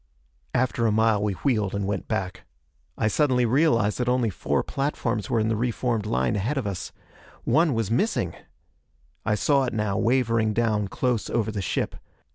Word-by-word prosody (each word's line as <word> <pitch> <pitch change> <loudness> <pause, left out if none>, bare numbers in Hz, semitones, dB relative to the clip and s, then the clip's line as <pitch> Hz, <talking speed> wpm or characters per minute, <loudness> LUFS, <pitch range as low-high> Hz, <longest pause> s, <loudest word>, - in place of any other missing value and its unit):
After 120 -2 +1
a - - +2
mile 110 -1 +3
we 105 -1 0
wheeled 105 -4 0
and 100 -1 -1
went 100 -1 -3
back. 95 -4 -3 0.6
I - - +1
suddenly 125 +1 +2
realized 115 -5 +2
that 125 0 0
only 125 -3 +1
four - - -1
platforms 120 -7 -2
were 115 - +2
in 110 - +1
the 110 - +1
re 120 +3 0
formed 115 -3 -1
line 110 - +1
ahead 115 +9 -1
of 135 - -1
us. 100 -3 -4 0.5
One 160 -5 +3
was 115 -2 -1
missing! 115 - 0 0.9
I 105 - +3
saw 140 +5 +2
it 125 - -3
now, 105 -2 -1
wavering 115 -3 +2
down, 110 -2 +1
close 120 +2 -1
over 110 -2 0
the 105 -2 -3
ship. - - -1
115 Hz, 180 wpm, -25 LUFS, 105-125 Hz, 0.9 s, mile